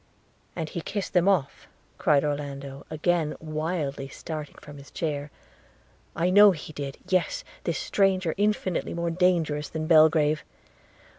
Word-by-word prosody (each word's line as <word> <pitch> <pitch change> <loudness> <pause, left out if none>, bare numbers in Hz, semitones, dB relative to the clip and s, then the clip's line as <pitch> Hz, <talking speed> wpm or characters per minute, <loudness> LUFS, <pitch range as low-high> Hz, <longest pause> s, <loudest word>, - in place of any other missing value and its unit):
'And 160 -3 -3
he 170 - -4
kissed 200 +3 -4
them 180 0 +3
off,' 180 -9 0 0.3
cried 145 -2 +3
Orlando, 140 -2 -4
again 160 0 0
wildly 155 -3 -3
starting 155 +2 -7
from 145 -1 -12
his 140 - -13
chair, 150 -5 -3 0.9
'I 175 +2 +1
know 205 +2 +9
he 155 -4 -4
did 140 -2 -5
– - - -22
yes! 190 - 0 0.2
this - - 0
stranger, 190 -4 +1
infinitely 205 -4 0
more 170 0 -1
dangerous 165 -4 +1
than 160 -1 -4
Belgrave 155 -1 +4
160 Hz, 140 wpm, -26 LUFS, 150-180 Hz, 0.9 s, know